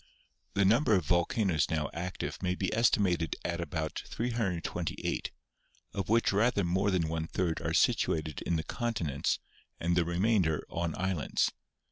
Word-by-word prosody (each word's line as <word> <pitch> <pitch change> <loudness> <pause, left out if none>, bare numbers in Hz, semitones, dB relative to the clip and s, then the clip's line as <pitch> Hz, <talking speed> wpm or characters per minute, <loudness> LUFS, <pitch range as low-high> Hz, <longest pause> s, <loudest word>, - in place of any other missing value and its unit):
The 100 - +4
number 115 +3 +4
of 90 -5 +1
volcanoes 85 -1 +2
now 75 -2 -1
active 90 +2 -4
may 90 -1 0
be 95 0 -1
estimated 95 -8 +2
at 85 0 -1
about 80 -1 -3
328, 115 -8 -2 0.6
of 100 -2 -3
which 115 +1 +4
rather 105 0 +3
more 95 +4 +1
than 90 -4 +1
one 80 0 -2
third 85 -3 -1
are - - -1
situ - - +3
ated 80 -2 -5
in 85 - 0
the 80 - -1
continents 90 - -1 0.4
and 85 +1 +1
the 85 - +4
remainder 85 -2 +1
on 85 -1 -2
islands. 90 -7 0
90 Hz, 150 wpm, -31 LUFS, 80-100 Hz, 0.6 s, The